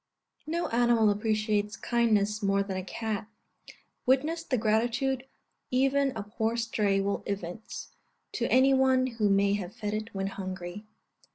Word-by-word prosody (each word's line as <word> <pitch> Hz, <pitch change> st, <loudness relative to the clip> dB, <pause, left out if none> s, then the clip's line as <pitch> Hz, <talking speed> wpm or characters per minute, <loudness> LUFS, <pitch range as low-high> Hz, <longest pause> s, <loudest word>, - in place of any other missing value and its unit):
No 340 Hz, +2 st, -1 dB
animal 235 Hz, -2 st, +4 dB
appreciates 215 Hz, 0 st, 0 dB
kindness 215 Hz, -3 st, +1 dB
more 200 Hz, 0 st, +2 dB
than 195 Hz, -1 st, -5 dB
a 185 Hz, -, -3 dB
cat. 215 Hz, +2 st, -4 dB, 0.8 s
Witness 300 Hz, +6 st, +2 dB
the 260 Hz, -6 st, 0 dB
gratitude 240 Hz, +4 st, +1 dB, 0.4 s
even 270 Hz, +2 st, +2 dB
a 215 Hz, -, -3 dB
poor 220 Hz, +2 st, -2 dB
stray 210 Hz, -4 st, +1 dB
will 200 Hz, +1 st, -1 dB
evince, 200 Hz, +1 st, -5 dB, 0.4 s
to -, -, -1 dB
any 265 Hz, +2 st, +5 dB
one 260 Hz, -1 st, +4 dB
who 225 Hz, -5 st, 0 dB
may 200 Hz, 0 st, +3 dB
have 200 Hz, -1 st, -4 dB
fed 210 Hz, -3 st, -3 dB
it 215 Hz, +1 st, -3 dB
when 195 Hz, -2 st, -3 dB
hungry. 190 Hz, +1 st, -6 dB
215 Hz, 145 wpm, -29 LUFS, 200-245 Hz, 0.8 s, any